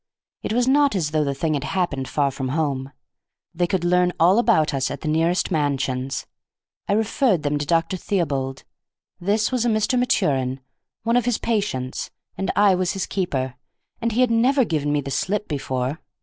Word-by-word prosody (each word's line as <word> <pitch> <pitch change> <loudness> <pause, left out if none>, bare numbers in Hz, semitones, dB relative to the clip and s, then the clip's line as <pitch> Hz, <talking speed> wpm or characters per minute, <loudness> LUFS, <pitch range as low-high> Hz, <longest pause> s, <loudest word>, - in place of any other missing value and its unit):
It - - -4
was 245 +2 +2
not 285 -2 +4
as 160 -6 -1
though 155 -1 +2
the 140 -1 -2
thing 155 +3 -1
had 145 -2 -1
happened 150 -7 -1
far 140 -2 +1
from 130 0 -4
home. 140 -2 -1 0.6
They 175 +1 0
could 185 -1 -1
learn 180 0 +3
all 180 +6 +5
about 220 -12 +3
us 135 0 0
at - - -6
the - - -4
nearest 165 +5 +1
mansions. 135 -4 -1 0.6
I - - +1
referred 220 - +1
them 145 0 0
to 145 - -3
Dr. 165 +3 +1
Theobald; 140 -9 -2 0.6
this 205 +5 +1
was 250 -2 +1
a 240 - +2
Mr. 225 +4 +1
Maturin, 135 - +1 0.4
one 230 +2 +2
of 245 - +1
his 245 -3 +1
patients, 200 - -2 0.3
and 195 - -3
I 205 -1 +5
was 185 0 0
his 195 -2 -2
keeper, 135 -9 -2 0.5
and 230 0 0
he 235 +4 +1
had 250 -2 +3
never 255 +3 +3
given 150 -5 -1
me 145 0 +1
the 140 0 -6
slip 210 +8 -1
before. 135 0 -2
170 Hz, 190 wpm, -23 LUFS, 140-210 Hz, 0.6 s, all